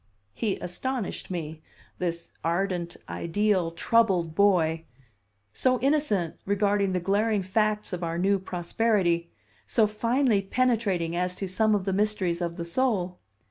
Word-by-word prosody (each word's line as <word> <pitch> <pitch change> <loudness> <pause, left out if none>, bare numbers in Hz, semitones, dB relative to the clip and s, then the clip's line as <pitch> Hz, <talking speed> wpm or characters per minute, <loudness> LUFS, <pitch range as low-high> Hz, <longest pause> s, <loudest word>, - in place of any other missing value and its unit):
He 210 -4 -1
astonished 230 +5 -4
me, 160 -3 -5 0.4
this 170 -1 -3
ardent, 175 0 -1
ideal, 185 0 0
troubled 180 -2 +2
boy; 165 -4 +3 0.7
so 255 - +2
innocent 265 - +1
regarding 200 -1 +1
the 180 - +1
glaring 200 +3 +1
facts 210 +1 0
of 180 -1 -3
our 165 0 -2
new 195 +2 +2
prosperity, 175 -1 0 0.4
so 225 - +3
finely 230 +1 +1
penetrating 195 -6 0
as 180 +1 -1
to 195 - -4
some 215 +3 +2
of 195 -2 -2
the 195 - 0
mysteries 190 -4 0
of 170 -1 -2
the 170 - -4
soul. 185 -3 0
195 Hz, 135 wpm, -27 LUFS, 175-215 Hz, 0.7 s, boy